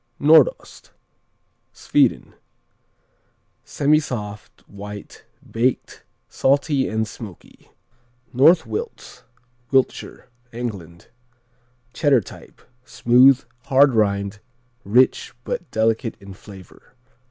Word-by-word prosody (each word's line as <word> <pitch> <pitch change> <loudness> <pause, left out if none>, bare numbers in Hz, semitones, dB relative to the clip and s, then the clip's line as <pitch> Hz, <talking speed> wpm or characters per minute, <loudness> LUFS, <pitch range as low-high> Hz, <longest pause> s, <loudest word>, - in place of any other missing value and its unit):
Nordost 155 -1 +2 0.8
Sweden - - 0 1.3
Semisoft; 125 -9 -2
white; 100 0 -11 0.3
baked; 120 +3 -2 0.2
salty 140 0 0
and 110 0 -2
smoky. 105 -4 -13 0.6
North 160 +7 +5
Wilts 460 0 -7 0.5
Wiltshire, 135 -1 -1 0.2
England 100 -8 -8 0.8
Cheddar 140 -5 +2
type; - - -15 0.2
smooth; 130 +2 +4 0.2
hard 135 0 +4
rind; 100 -1 0 0.4
rich 125 +6 +1
but 185 - -5
delicate 115 0 -1
in 100 -1 -12
flavor. 95 +3 -16
120 Hz, 75 wpm, -21 LUFS, 105-140 Hz, 1.3 s, North